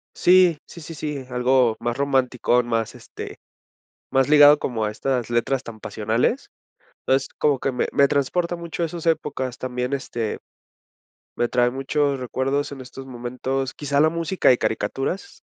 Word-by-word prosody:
Sí 180 Hz, -3 st, +5 dB
sí 170 Hz, -, -11 dB
sí 165 Hz, -, -8 dB
sí, 150 Hz, -3 st, -4 dB
algo 125 Hz, -2 st, +2 dB
más 120 Hz, +1 st, -2 dB
romanticón, 125 Hz, -3 st, +1 dB
más, 115 Hz, -1 st, -1 dB
este, -, -, -9 dB, 0.7 s
más 135 Hz, +1 st, +2 dB
ligado 145 Hz, 0 st, +8 dB
como 110 Hz, -4 st, -2 dB
a 105 Hz, -, -1 dB
estas 120 Hz, 0 st, -2 dB
letras 130 Hz, +3 st, 0 dB
tan 110 Hz, -2 st, -9 dB
pasionales, 115 Hz, -, -1 dB, 0.6 s
entonces, 135 Hz, 0 st, +2 dB
como 145 Hz, -3 st, +3 dB
que 135 Hz, -, -1 dB
me 125 Hz, -, -1 dB
me 140 Hz, 0 st, +4 dB
transporta 170 Hz, +5 st, 0 dB
mucho 170 Hz, 0 st, -5 dB
a -, -, +2 dB
esas 165 Hz, 0 st, -6 dB
épocas 130 Hz, -6 st, -1 dB
también, 125 Hz, +1 st, -3 dB
este, 120 Hz, -5 st, -3 dB, 1.0 s
me 120 Hz, -, +1 dB
trae 120 Hz, -1 st, +2 dB
muchos 135 Hz, +1 st, 0 dB
recuerdos 135 Hz, +3 st, -1 dB
en 135 Hz, -2 st, -8 dB
estos 135 Hz, +1 st, -10 dB
momentos, 130 Hz, +2 st, -3 dB
quizá 145 Hz, -1 st, -1 dB
la 155 Hz, +1 st, +5 dB
música 170 Hz, +3 st, +1 dB
de 125 Hz, -, +5 dB
caricaturas. 135 Hz, -, -3 dB
135 Hz, 160 wpm, -23 LUFS, 125-150 Hz, 1.0 s, ligado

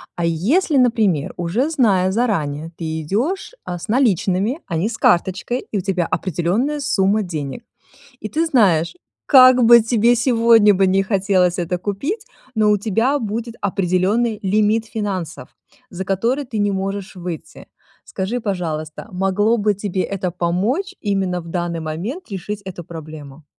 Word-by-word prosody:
А 170 Hz, -, -1 dB
если, 250 Hz, -, +1 dB
например, 220 Hz, -, +2 dB
уже 190 Hz, -, 0 dB
зная 200 Hz, -, +2 dB
заранее, 165 Hz, -9 st, -1 dB
ты 160 Hz, -1 st, -4 dB
идёшь, 240 Hz, -, -2 dB
а, 180 Hz, -, -5 dB
с 175 Hz, -, -9 dB
наличными, 215 Hz, -, +1 dB
а 170 Hz, -, -3 dB
не 185 Hz, +7 st, 0 dB
с 230 Hz, -, -6 dB
карточкой, 190 Hz, +8 st, +1 dB
и 210 Hz, -, -1 dB
у -, -, -1 dB
тебя 185 Hz, -2 st, -1 dB
определённая 195 Hz, -, -1 dB
сумма 215 Hz, -6 st, +1 dB
денег. 160 Hz, -, -5 dB, 0.6 s
И 215 Hz, -, -5 dB
ты 320 Hz, +10 st, 0 dB
знаешь, 190 Hz, -, +3 dB, 0.3 s
как 255 Hz, -2 st, +7 dB
бы 235 Hz, +1 st, +8 dB
тебе 230 Hz, +1 st, +3 dB
сегодня 230 Hz, -4 st, +4 dB
бы 195 Hz, +1 st, +3 dB
не 190 Hz, +1 st, +2 dB
хотелось 190 Hz, -3 st, +1 dB
это 175 Hz, +1 st, -2 dB
купить, 275 Hz, -, -4 dB, 0.3 s
но 215 Hz, -2 st, +3 dB
у 210 Hz, -, +3 dB
тебя 225 Hz, +7 st, +1 dB
будет 230 Hz, 0 st, -4 dB
определённый 200 Hz, +4 st, 0 dB
лимит 215 Hz, +3 st, +1 dB
финансов, 195 Hz, -7 st, -4 dB, 0.4 s
за 185 Hz, +1 st, -5 dB
который 230 Hz, +9 st, 0 dB
ты 235 Hz, -4 st, -5 dB
не 205 Hz, -1 st, +1 dB
можешь 195 Hz, +1 st, -4 dB
выйти. 175 Hz, -3 st, -7 dB, 0.4 s
Скажи, 205 Hz, +6 st, -3 dB
пожалуйста, 165 Hz, -5 st, -4 dB
могло 195 Hz, +5 st, +1 dB
бы 210 Hz, -2 st, +1 dB
тебе 195 Hz, -2 st, -2 dB
это 190 Hz, -2 st, -3 dB
помочь 200 Hz, -, -1 dB
именно 195 Hz, -4 st, -1 dB
в 170 Hz, -, -11 dB
данный 175 Hz, -1 st, -3 dB
момент 175 Hz, -, -5 dB
решить 200 Hz, +2 st, -5 dB
эту 185 Hz, -2 st, -7 dB
проблему? 155 Hz, -3 st, -10 dB
195 Hz, 155 wpm, -20 LUFS, 180-230 Hz, 0.6 s, бы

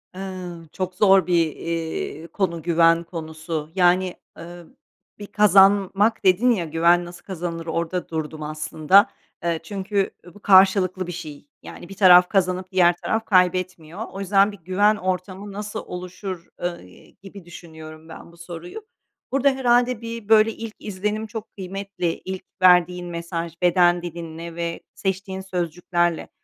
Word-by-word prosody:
Eee, 185 Hz, -1 st, -6 dB, 0.2 s
çok 185 Hz, -1 st, -4 dB
zor 195 Hz, -3 st, +4 dB
bir, 175 Hz, -, +2 dB, 0.2 s
iii, 165 Hz, -1 st, -4 dB
konu 170 Hz, -4 st, -2 dB
güven 165 Hz, 0 st, +3 dB
konusu. 160 Hz, -2 st, -6 dB
Yani, 180 Hz, 0 st, +3 dB, 0.2 s
eee, 175 Hz, +1 st, -10 dB, 0.6 s
bir 205 Hz, -, -8 dB
kazanmak 200 Hz, +1 st, +4 dB
dedin 200 Hz, +7 st, +4 dB
ya, 180 Hz, -7 st, 0 dB
güven 170 Hz, +2 st, +3 dB
nasıl 175 Hz, 0 st, -12 dB
kazanılır. 170 Hz, -3 st, -5 dB
orada 170 Hz, +2 st, -3 dB
durdum 155 Hz, -1 st, -5 dB
aslında. 155 Hz, +6 st, +3 dB, 0.3 s
Eee, 170 Hz, -1 st, 0 dB
çünkü, 195 Hz, +2 st, -2 dB
ııı, 175 Hz, -, -14 dB
bu -, -, -16 dB
karşılıklı 190 Hz, -2 st, +4 dB
bir -, -, -4 dB
şey. 155 Hz, -4 st, -9 dB, 0.2 s
Yani 175 Hz, -, -11 dB
bir 195 Hz, -, -9 dB
taraf 180 Hz, -2 st, +7 dB
kazanıp 185 Hz, -1 st, 0 dB
diğer 175 Hz, -2 st, +4 dB
taraf 220 Hz, 0 st, -1 dB
kaybetmiyor. 185 Hz, -1 st, 0 dB
O 195 Hz, -, -8 dB
yüzden 195 Hz, +1 st, +3 dB
"Bir 205 Hz, -, -12 dB
güven 195 Hz, +5 st, +2 dB
ortamı 185 Hz, +1 st, -4 dB
nasıl 205 Hz, +1 st, -5 dB
oluşur?", 180 Hz, 0 st, -7 dB, 0.2 s
eee, 170 Hz, -, -7 dB
gibi 195 Hz, -2 st, -12 dB
düşünüyorum 160 Hz, -2 st, -12 dB
ben 165 Hz, -, -11 dB
bu 170 Hz, -, -20 dB
soruyu. 170 Hz, -, -9 dB, 0.5 s
Burada 275 Hz, +1 st, +3 dB
herhâlde 245 Hz, -2 st, +2 dB
bir, 230 Hz, -2 st, -7 dB
böyle, 220 Hz, 0 st, +5 dB
ilk 225 Hz, -1 st, -8 dB
izlenim 210 Hz, +2 st, -3 dB
çok 220 Hz, 0 st, -8 dB
kıymetli, 190 Hz, -2 st, -4 dB
ilk 190 Hz, 0 st, -5 dB, 0.2 s
verdiğin 180 Hz, -1 st, +4 dB
mesaj 170 Hz, -1 st, -5 dB
beden 175 Hz, 0 st, +4 dB
dilinle 170 Hz, -1 st, -7 dB
ve 170 Hz, -1 st, -3 dB, 0.2 s
seçtiğin 190 Hz, 0 st, -3 dB
sözcüklerle. 175 Hz, -2 st, -2 dB
180 Hz, 145 wpm, -22 LUFS, 170-195 Hz, 0.6 s, taraf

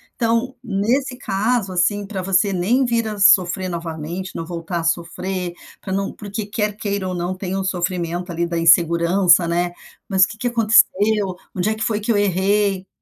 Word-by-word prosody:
Então, 230 Hz, +2 st, 0 dB
nesse 240 Hz, +5 st, 0 dB
caso, 210 Hz, 0 st, -1 dB
assim, 200 Hz, +3 st, +1 dB
pra 195 Hz, -2 st, -4 dB
você 195 Hz, +2 st, +2 dB
nem 220 Hz, +9 st, +1 dB
vir 235 Hz, -2 st, 0 dB
a 210 Hz, -1 st, -6 dB
sofrer 185 Hz, -1 st, +4 dB
novamente, 170 Hz, +2 st, -5 dB
não 165 Hz, -, -4 dB
voltar 170 Hz, 0 st, -4 dB
a -, -, -4 dB
sofrer 180 Hz, +2 st, -2 dB, 0.3 s
para 190 Hz, -, -7 dB
não 195 Hz, 0 st, -2 dB
porque 205 Hz, 0 st, -6 dB
quer 210 Hz, 0 st, -2 dB
queira 200 Hz, -3 st, -3 dB
ou -, -, -3 dB
não 175 Hz, +1 st, -3 dB
tem 190 Hz, 0 st, -4 dB
um 195 Hz, -, -2 dB
sofrimento 180 Hz, -1 st, -2 dB
ali 170 Hz, 0 st, -1 dB
da 170 Hz, 0 st, -3 dB
insegurança, 170 Hz, +2 st, +4 dB
né. 175 Hz, +1 st, 0 dB, 0.4 s
Mas 190 Hz, -2 st, +4 dB
o -, -, +5 dB
que 220 Hz, -, -9 dB
que 245 Hz, -, -2 dB
aconteceu? 215 Hz, -4 st, +3 dB, 0.2 s
Onde 185 Hz, +3 st, 0 dB
é 220 Hz, -, -1 dB
que 220 Hz, -, -4 dB
foi 215 Hz, -2 st, 0 dB
que 220 Hz, +3 st, -1 dB
eu 210 Hz, -, +2 dB
errei? 195 Hz, 0 st, +1 dB
190 Hz, 190 wpm, -20 LUFS, 175-210 Hz, 0.4 s, o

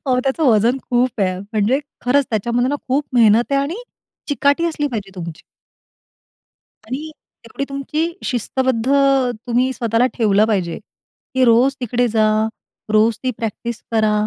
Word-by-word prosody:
अहो 250 Hz, -1 st, +2 dB
त्याचं 270 Hz, +4 st, 0 dB
वजन 235 Hz, +2 st, +3 dB
खूप 245 Hz, -2 st, +1 dB
आहे 185 Hz, -2 st, 0 dB
म्हणजे 215 Hz, +6 st, 0 dB, 0.2 s
खरंच 275 Hz, +2 st, +3 dB
त्याच्यामध्ये 235 Hz, +4 st, 0 dB
ना, 290 Hz, -, 0 dB
खूप 280 Hz, +3 st, +1 dB
मेहनत 230 Hz, +2 st, +4 dB
आहे 275 Hz, -, +3 dB
आणि 295 Hz, +6 st, -3 dB, 0.5 s
चिकाटी 285 Hz, +2 st, +2 dB
असली 305 Hz, -3 st, -1 dB
पाहिजे 210 Hz, -6 st, -5 dB
तुमची. 170 Hz, -3 st, -7 dB, 1.5 s
आणि 290 Hz, +6 st, -5 dB, 0.4 s
एवढी 230 Hz, +4 st, -4 dB
तुमची 300 Hz, +5 st, -2 dB
शिस्तबद्ध 255 Hz, 0 st, -1 dB, 0.6 s
तुम्ही 250 Hz, +2 st, +1 dB
स्वतःला 235 Hz, 0 st, +1 dB
ठेवलं 210 Hz, -3 st, +3 dB
पाहिजे 185 Hz, -6 st, -1 dB, 0.6 s
की 260 Hz, 0 st, +3 dB
रोज 245 Hz, +3 st, +4 dB
तिकडे 245 Hz, +1 st, 0 dB
जा. 215 Hz, -1 st, +2 dB, 0.5 s
रोज 220 Hz, +1 st, +4 dB
ती 255 Hz, -, 0 dB
प्रॅक्टिस 230 Hz, 0 st, -5 dB
करा 215 Hz, -1 st, +2 dB
240 Hz, 140 wpm, -19 LUFS, 215-265 Hz, 1.5 s, मेहनत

